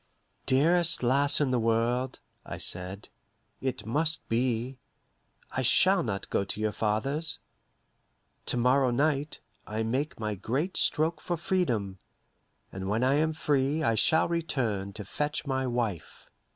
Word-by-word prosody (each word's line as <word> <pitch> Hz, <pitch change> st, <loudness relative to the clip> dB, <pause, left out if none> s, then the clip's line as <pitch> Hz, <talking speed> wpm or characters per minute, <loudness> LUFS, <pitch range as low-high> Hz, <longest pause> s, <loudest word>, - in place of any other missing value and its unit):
"Dearest 165 Hz, +4 st, +3 dB
lass 140 Hz, +4 st, +4 dB
in 145 Hz, -3 st, +1 dB
the 125 Hz, -, +2 dB
world," 115 Hz, +3 st, 0 dB, 0.2 s
I -, -, -7 dB
said, 90 Hz, +3 st, -3 dB, 0.5 s
"it 130 Hz, -2 st, -3 dB
must 155 Hz, +8 st, 0 dB
be. 125 Hz, +2 st, -1 dB, 0.7 s
I 130 Hz, -, -1 dB
shall 185 Hz, +9 st, +5 dB
not 105 Hz, -9 st, -4 dB
go -, -, +1 dB
to 100 Hz, -, -5 dB
your 110 Hz, 0 st, 0 dB
father's. 135 Hz, +10 st, -1 dB, 1.1 s
To -, -, +1 dB
morrow 130 Hz, +2 st, +3 dB
night, 145 Hz, +3 st, 0 dB, 0.3 s
I 110 Hz, +2 st, -2 dB
make 130 Hz, +6 st, -2 dB
my 110 Hz, -1 st, -2 dB
great 135 Hz, -, -2 dB
stroke 160 Hz, +2 st, +2 dB
for 175 Hz, -, -2 dB
freedom, 120 Hz, -, -1 dB, 0.7 s
and 95 Hz, 0 st, -5 dB
when 110 Hz, +4 st, +1 dB
I 130 Hz, +2 st, +3 dB
am 155 Hz, +1 st, +1 dB
free 145 Hz, 0 st, 0 dB
I 115 Hz, -, +2 dB
shall 160 Hz, +9 st, +3 dB
return 120 Hz, -, -2 dB
to 105 Hz, -, -7 dB
fetch 150 Hz, +10 st, -2 dB
my 130 Hz, -2 st, -1 dB
wife." 115 Hz, -8 st, -3 dB
130 Hz, 140 wpm, -28 LUFS, 110-150 Hz, 1.1 s, shall